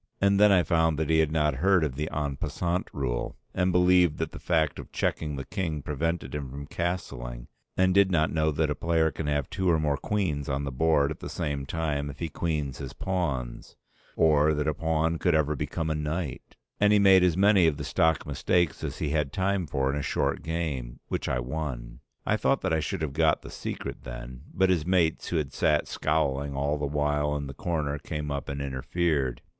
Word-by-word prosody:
And 100 Hz, 0 st, +3 dB
then 105 Hz, 0 st, +7 dB
I 90 Hz, -3 st, +5 dB
found 80 Hz, 0 st, +2 dB
that 80 Hz, 0 st, 0 dB
he 80 Hz, -, +4 dB
had 80 Hz, -2 st, +2 dB
not 75 Hz, -3 st, +1 dB
heard 95 Hz, +2 st, +3 dB
of 75 Hz, -4 st, -1 dB
the 75 Hz, +4 st, -3 dB
"en 75 Hz, -2 st, -2 dB
passant" 90 Hz, +5 st, -2 dB
rule, 65 Hz, -4 st, -3 dB, 0.2 s
and 90 Hz, 0 st, +1 dB
believed 90 Hz, -3 st, +4 dB
that 80 Hz, -, -2 dB
the -, -, -9 dB
fact 80 Hz, -4 st, +1 dB
of -, -, -9 dB
checking 75 Hz, -2 st, -1 dB
the 70 Hz, -1 st, -5 dB
king 80 Hz, -7 st, -3 dB
prevented 80 Hz, +4 st, -2 dB
him 70 Hz, -3 st, -4 dB
from 70 Hz, +2 st, -7 dB
castling, -, -, -4 dB, 0.3 s
and 95 Hz, 0 st, +4 dB
did 100 Hz, 0 st, +5 dB
not 80 Hz, -4 st, +1 dB
know 80 Hz, -1 st, +2 dB
that 75 Hz, 0 st, 0 dB
a -, -, +2 dB
player 80 Hz, 0 st, +1 dB
can 75 Hz, +1 st, -5 dB
have 75 Hz, -2 st, 0 dB
two 95 Hz, -2 st, 0 dB
or 85 Hz, -, +4 dB
more 75 Hz, -2 st, 0 dB
queens 75 Hz, -7 st, -1 dB
on 70 Hz, +1 st, -1 dB
the 70 Hz, -, -3 dB
board 70 Hz, +1 st, +2 dB
at -, -, -6 dB
the -, -, -6 dB
same 70 Hz, -5 st, -3 dB
time 75 Hz, -2 st, -2 dB
if 70 Hz, -, -8 dB
he 85 Hz, -, -3 dB
queens 75 Hz, -4 st, -2 dB
his -, -, -6 dB
pawns, 70 Hz, -11 st, -3 dB, 0.4 s
or 75 Hz, -1 st, +4 dB
that 75 Hz, +1 st, -1 dB
a 75 Hz, -, +2 dB
pawn 80 Hz, +1 st, 0 dB
could 90 Hz, -3 st, +2 dB
ever 75 Hz, 0 st, +2 dB
become 80 Hz, +4 st, -2 dB
a -, -, +2 dB
knight; 75 Hz, -1 st, -4 dB, 0.2 s
and 105 Hz, 0 st, +4 dB
he 105 Hz, -, +6 dB
made 95 Hz, -2 st, +6 dB
as 90 Hz, -2 st, +3 dB
many 100 Hz, -3 st, +5 dB
of 75 Hz, -3 st, +1 dB
the 75 Hz, -, -5 dB
stock 80 Hz, +3 st, +1 dB
mistakes 85 Hz, +4 st, 0 dB
as -, -, -4 dB
he 75 Hz, -, -2 dB
had 75 Hz, -2 st, 0 dB
time 95 Hz, 0 st, 0 dB
for 70 Hz, -1 st, 0 dB
in -, -, -1 dB
a 75 Hz, -, -1 dB
short -, -, -1 dB
game, 75 Hz, -7 st, -3 dB
which -, -, -2 dB
I 65 Hz, -, +1 dB
won. 60 Hz, -2 st, -4 dB, 0.3 s
I -, -, +2 dB
thought -, -, +1 dB
that -, -, 0 dB
I 80 Hz, -, +2 dB
should 80 Hz, +1 st, -3 dB
have 70 Hz, -3 st, -3 dB
got 80 Hz, 0 st, +3 dB
at -, -, -34 dB
the -, -, -9 dB
secret -, -, -5 dB
then, 60 Hz, +2 st, -8 dB
but 95 Hz, 0 st, +2 dB
his 85 Hz, -4 st, +1 dB
mates 85 Hz, -2 st, +1 dB
who -, -, -2 dB
had 75 Hz, -4 st, -2 dB
sat 75 Hz, -1 st, +2 dB
scowling 70 Hz, -2 st, 0 dB
all 70 Hz, +2 st, 0 dB
the 75 Hz, -, -1 dB
while 75 Hz, 0 st, 0 dB
in 70 Hz, -1 st, -3 dB
the 70 Hz, -, -7 dB
corner 75 Hz, -1 st, -2 dB
came 75 Hz, 0 st, -4 dB
up 70 Hz, -1 st, -4 dB
and 70 Hz, 0 st, -3 dB
interfered. 70 Hz, -1 st, -1 dB
75 Hz, 225 wpm, -27 LUFS, 70-85 Hz, 0.4 s, then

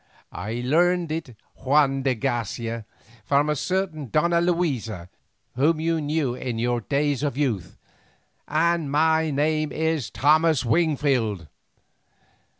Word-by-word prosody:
"I 110 Hz, +7 st, -4 dB
learned 175 Hz, +3 st, +2 dB
it, 155 Hz, -7 st, -5 dB, 0.2 s
Juan 135 Hz, 0 st, +2 dB
de 130 Hz, -1 st, +1 dB
Garcia, 115 Hz, 0 st, -3 dB, 0.4 s
from 145 Hz, +4 st, +2 dB
a -, -, 0 dB
certain 170 Hz, -4 st, -2 dB
Donna 170 Hz, +6 st, +2 dB
Luisa, 130 Hz, -, -1 dB, 0.5 s
whom 155 Hz, +5 st, +2 dB
you 165 Hz, 0 st, 0 dB
knew 145 Hz, -3 st, -1 dB
in 125 Hz, -2 st, -4 dB
your 120 Hz, +1 st, 0 dB
days 140 Hz, +2 st, 0 dB
of 145 Hz, -3 st, -2 dB
youth. 125 Hz, -, -2 dB, 0.7 s
And 165 Hz, 0 st, +1 dB
my 160 Hz, +2 st, +2 dB
name 155 Hz, +1 st, 0 dB
is 160 Hz, -5 st, -1 dB
Thomas 155 Hz, -2 st, +3 dB
Wingfield." 130 Hz, -, +1 dB
145 Hz, 120 wpm, -24 LUFS, 120-160 Hz, 0.7 s, Thomas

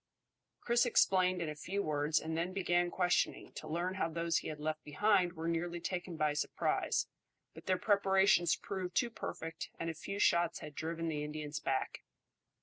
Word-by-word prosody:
Chris 235 Hz, 0 st, +3 dB
explained 185 Hz, -6 st, +3 dB
in 160 Hz, -, -3 dB
a -, -, -3 dB
few 190 Hz, +7 st, -3 dB
words, 150 Hz, 0 st, +1 dB
and 160 Hz, 0 st, -4 dB
then 170 Hz, +3 st, -1 dB
began 175 Hz, -2 st, +1 dB
questioning, 180 Hz, 0 st, 0 dB
to 155 Hz, -, -8 dB
learn 170 Hz, +4 st, -1 dB
how 190 Hz, -3 st, -1 dB
those 165 Hz, +1 st, 0 dB
he -, -, -3 dB
had 155 Hz, -1 st, -5 dB
left 155 Hz, +1 st, -3 dB
behind 185 Hz, +3 st, +2 dB
were 165 Hz, -1 st, -4 dB
nearly 170 Hz, +1 st, -1 dB
taken 175 Hz, -1 st, -4 dB
by 155 Hz, -1 st, +2 dB
surprise, 150 Hz, -, 0 dB, 0.5 s
but -, -, -13 dB
their 185 Hz, -1 st, +3 dB
preparations 195 Hz, -4 st, +4 dB
proved 185 Hz, -1 st, -5 dB
too 240 Hz, -1 st, +2 dB
perfect 165 Hz, -6 st, -6 dB
and 165 Hz, 0 st, -2 dB
a -, -, -7 dB
few 180 Hz, +5 st, -6 dB
shots 170 Hz, -4 st, +3 dB
had 150 Hz, -, -8 dB
driven 165 Hz, +2 st, -3 dB
the 150 Hz, -2 st, -2 dB
Indians 150 Hz, 0 st, -4 dB
back. 135 Hz, -1 st, -2 dB
170 Hz, 180 wpm, -34 LUFS, 155-185 Hz, 0.5 s, preparations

